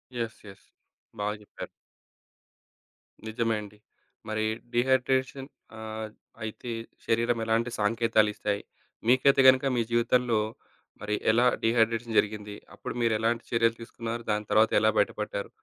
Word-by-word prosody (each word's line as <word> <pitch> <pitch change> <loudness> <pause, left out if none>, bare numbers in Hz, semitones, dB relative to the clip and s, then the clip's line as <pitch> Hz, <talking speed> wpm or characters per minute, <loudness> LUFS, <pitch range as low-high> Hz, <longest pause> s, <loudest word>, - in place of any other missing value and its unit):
Yes, 115 -2 -4
yes. 100 - -14 0.5
బాగా 105 +1 -1
చెప్పారు. 105 - -9 1.6
నిజమే 115 0 0
అండి. 105 0 -12 0.5
మరి 110 0 -1 0.3
డీహైడ్రేషన్ 130 +2 +1 0.3
ఆహ్, 110 0 -5 0.3
అయితే 110 +2 -6 0.3
శరీరం 115 +1 +1
ఎలాంటి 115 +2 +1
సంకేతాలు 110 0 +3
ఇస్తాయి? 100 -1 -2 0.5
మీకైతే 135 +2 +5
గనుక 130 +1 +4
మీ 120 - +3
జీవితంలో 120 0 +2 0.6
మరి 105 0 -1 0.2
ఎలా 120 +3 +3 0.2
డీహైడ్రేషన్ 115 0 +1
జరిగింది? 105 -1 -3 0.2
అప్పుడు - - -6
మీరెలాంటి 115 +1 +1
చర్యలు 115 -1 +2
తీసుకున్నారు? 115 0 -6
దాని 105 0 -1
తర్వాత 110 +1 +4
ఎలా 110 +1 +4
బయటపడ్డారు? 105 0 -2
115 Hz, 115 wpm, -28 LUFS, 110-120 Hz, 1.6 s, మీకైతే